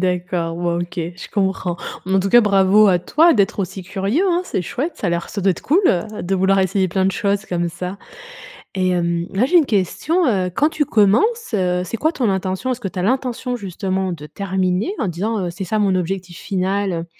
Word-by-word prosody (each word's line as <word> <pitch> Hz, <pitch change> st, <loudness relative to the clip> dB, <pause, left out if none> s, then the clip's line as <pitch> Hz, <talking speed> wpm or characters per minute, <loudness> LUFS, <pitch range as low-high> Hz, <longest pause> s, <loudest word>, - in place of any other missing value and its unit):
d'accord, 180 Hz, -2 st, -1 dB
bon 175 Hz, 0 st, -1 dB
OK, 175 Hz, +1 st, -6 dB, 0.2 s
je 180 Hz, -, -9 dB
comprends. 190 Hz, -3 st, -1 dB, 0.3 s
Bon, 190 Hz, -, 0 dB
en 190 Hz, -, +4 dB
tout 195 Hz, -, -2 dB
cas, 240 Hz, -, +8 dB
bravo 200 Hz, 0 st, +4 dB
à 180 Hz, -2 st, +4 dB
toi 325 Hz, -, +4 dB
d'être 205 Hz, +2 st, +1 dB
aussi 190 Hz, 0 st, -3 dB
curieux, 195 Hz, -, -1 dB
hein. 350 Hz, -1 st, +2 dB
C'est 190 Hz, -, -2 dB
chouette, 280 Hz, -, -3 dB
ça 195 Hz, -, -2 dB
a -, -, 0 dB
l'air 170 Hz, 0 st, -2 dB
ça 200 Hz, -, -4 dB
doit 195 Hz, -, +4 dB
être 180 Hz, -, -3 dB
cool, 320 Hz, +7 st, +2 dB
heu, 210 Hz, -, 0 dB
de 190 Hz, +2 st, -1 dB
vouloir 190 Hz, +1 st, +3 dB
essayer 190 Hz, 0 st, +1 dB
plein 190 Hz, +2 st, 0 dB
de 190 Hz, -, +2 dB
choses 200 Hz, +1 st, 0 dB
comme 175 Hz, -3 st, -1 dB
ça. 180 Hz, +3 st, -6 dB, 0.8 s
Et 185 Hz, -1 st, +1 dB
hem, 170 Hz, -1 st, 0 dB
là 205 Hz, +6 st, +2 dB
j'ai 350 Hz, +6 st, +3 dB
une 330 Hz, -, +6 dB
question: 280 Hz, -, 0 dB
heu, 190 Hz, -6 st, +1 dB
quand 295 Hz, -, +3 dB
tu 305 Hz, -1 st, 0 dB
commences, 245 Hz, -, +2 dB
heu, 180 Hz, -2 st, +1 dB
c'est 185 Hz, -, -4 dB
quoi 315 Hz, +8 st, +1 dB
ton 250 Hz, -8 st, 0 dB
intention? 190 Hz, +5 st, -1 dB
Est-ce 250 Hz, -, -6 dB
que 200 Hz, -, -3 dB
tu 185 Hz, -, -8 dB
as -, -, 0 dB
l'intention, 250 Hz, +2 st, -1 dB
justement, 190 Hz, -2 st, -3 dB
de 150 Hz, -3 st, -7 dB
terminer 190 Hz, -, -1 dB
en 215 Hz, -, -1 dB
disant, 195 Hz, +3 st, -2 dB
heu: -, -, -3 dB
«C'est 190 Hz, +3 st, -6 dB
ça 215 Hz, +4 st, -1 dB
mon 200 Hz, -3 st, +2 dB
objectif 180 Hz, -1 st, -3 dB
final»? 190 Hz, -2 st, -2 dB
195 Hz, 225 wpm, -20 LUFS, 180-220 Hz, 0.8 s, cas